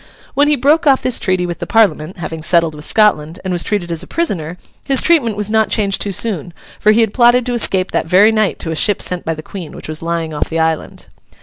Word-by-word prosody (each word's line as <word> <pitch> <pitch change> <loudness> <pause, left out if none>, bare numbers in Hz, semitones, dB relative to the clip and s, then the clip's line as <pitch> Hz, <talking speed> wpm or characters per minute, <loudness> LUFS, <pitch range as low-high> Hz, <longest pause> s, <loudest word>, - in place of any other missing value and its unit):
When 290 +1 +3
he 300 - +3
broke 295 +5 +2
off 270 -2 +3
this 255 -2 +2
treaty 185 -2 0
with 175 -1 -5
the - - -5
Parliament 190 -7 +1
(having 160 -2 -6
settled 165 0 +2
with 150 0 -9
Scotland) 180 -7 +1
and 185 -1 -3
was 175 - 0
treated 180 -4 -2
as 165 - -2
a - - -8
prisoner, 180 - -3 0.3
his 270 -2 +2
treatment 255 -11 +2
was 210 -1 -2
not 220 0 +1
changed 200 -3 0
too 205 - -1
soon, 180 -5 -1 0.2
for 215 - +4
he 225 +2 +3
had 220 -2 0
plotted 240 0 +4
to 250 - -2
escape 190 -5 0
that - - -1
very 195 +6 +5
night 215 -3 0
to 165 - -4
a - - -3
ship 205 +5 +1
sent 180 -1 -4
by 165 - -2
the 155 - -9
Queen, 175 -4 -9
which - - -8
was 155 0 -6
lying 165 -1 -3
off 150 - -3
the 165 - -3
island. 160 -1 -2
190 Hz, 250 wpm, -16 LUFS, 165-225 Hz, 0.3 s, very